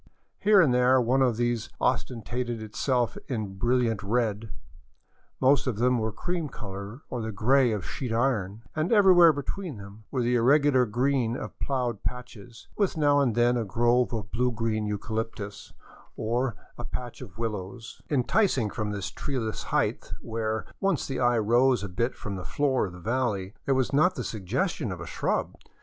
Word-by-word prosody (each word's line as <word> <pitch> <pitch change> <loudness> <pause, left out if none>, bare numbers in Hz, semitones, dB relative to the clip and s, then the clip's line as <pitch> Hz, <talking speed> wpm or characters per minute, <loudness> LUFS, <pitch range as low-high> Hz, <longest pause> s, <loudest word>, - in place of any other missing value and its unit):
Here 205 0 +5
and 150 -9 +5
there 125 +1 +4
one 125 +2 +2
of 125 -4 +2
these 120 -1 -1
ostentated 120 -1 -1
itself 120 +3 -1
in 105 -8 -4
brilliant 120 -3 +1
red; 110 0 -1 0.9
most 135 +1 +3
of 120 -5 -1
them 125 +1 +2
were 110 0 -1
cream 170 +6 -3
color 100 +3 -8
or 125 - -2
the 110 0 -3
gray 125 +5 +3
of 105 -4 -3
sheet 125 -4 -4
iron; 115 -4 0
and 155 +2 0
everywhere 185 -6 +7
between 150 - -5
them 100 +2 -12
were 130 -3 -1
the 120 +1 +2
irregular 130 +1 +4
green 125 +1 +1
of - - -8
plowed 125 -6 -1
patches, 120 -2 -7
with 200 -5 0
now 145 -2 +4
and 125 -6 +2
then 120 +1 +3
a 120 - 0
grove 120 +5 +2
of 110 -4 -4
blue 125 +2 +1
green 110 -2 -1
eucalyptus, 105 0 -4 0.4
or 120 +1 -1 0.2
a - - -4
patch 125 0 -6
of 105 -6 -10
willows, 110 0 -5
enticing 135 - +2
from 105 -2 -3
this 100 -1 -4
treeless 120 -7 -3
height - - -1
where, 110 -1 -3
once 195 -5 +1
the 135 - -3
eye 120 -1 +3
rose 120 +3 +3
a - - -3
bit 115 +7 -2
from 100 -2 -5
the 95 - -6
floor 135 -3 0
of 90 - -10
the 90 - -10
valley, 105 -3 -1
there 135 - +3
was 130 0 0
not 180 +6 +4
the - - -3
suggestion 115 - -2
of 90 - -5
a 85 - -6
shrub. - - -2
120 Hz, 175 wpm, -27 LUFS, 110-130 Hz, 0.9 s, everywhere